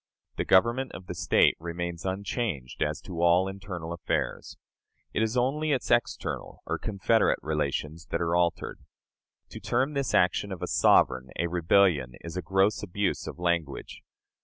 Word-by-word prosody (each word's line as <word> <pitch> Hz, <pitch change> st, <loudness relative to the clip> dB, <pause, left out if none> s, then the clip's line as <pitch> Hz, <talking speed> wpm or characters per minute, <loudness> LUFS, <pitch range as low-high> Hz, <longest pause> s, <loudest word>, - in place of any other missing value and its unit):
The -, -, -1 dB
government 120 Hz, +7 st, +3 dB
of 95 Hz, -, -9 dB
the 90 Hz, -, -5 dB
State 85 Hz, -3 st, +3 dB
remains 85 Hz, +1 st, -5 dB
unchanged 95 Hz, -, -3 dB
as -, -, -1 dB
to 85 Hz, -2 st, -6 dB
all 85 Hz, +2 st, +4 dB
internal 95 Hz, -4 st, -6 dB
affairs. 85 Hz, -4 st, -3 dB, 0.6 s
It -, -, 0 dB
is 110 Hz, +2 st, 0 dB
only 145 Hz, +5 st, +1 dB
its 130 Hz, -, -2 dB
external 120 Hz, -1 st, -1 dB
or -, -, -2 dB
confederate 110 Hz, +2 st, +2 dB
relations 75 Hz, +1 st, -2 dB
that -, -, -2 dB
are 85 Hz, 0 st, 0 dB
altered. 85 Hz, -1 st, 0 dB, 0.7 s
To -, -, -8 dB
term 130 Hz, +5 st, 0 dB
this 140 Hz, -3 st, -1 dB
action 95 Hz, +2 st, +2 dB
of 95 Hz, -, -5 dB
a -, -, -1 dB
sovereign 65 Hz, 0 st, +3 dB
a 85 Hz, -, +1 dB
"rebellion," 85 Hz, -6 st, +3 dB
is 85 Hz, 0 st, -8 dB
a 90 Hz, -, -2 dB
gross 95 Hz, +2 st, +2 dB
abuse 100 Hz, 0 st, -2 dB
of -, -, -6 dB
language. 85 Hz, -5 st, -2 dB
90 Hz, 160 wpm, -28 LUFS, 85-105 Hz, 0.7 s, all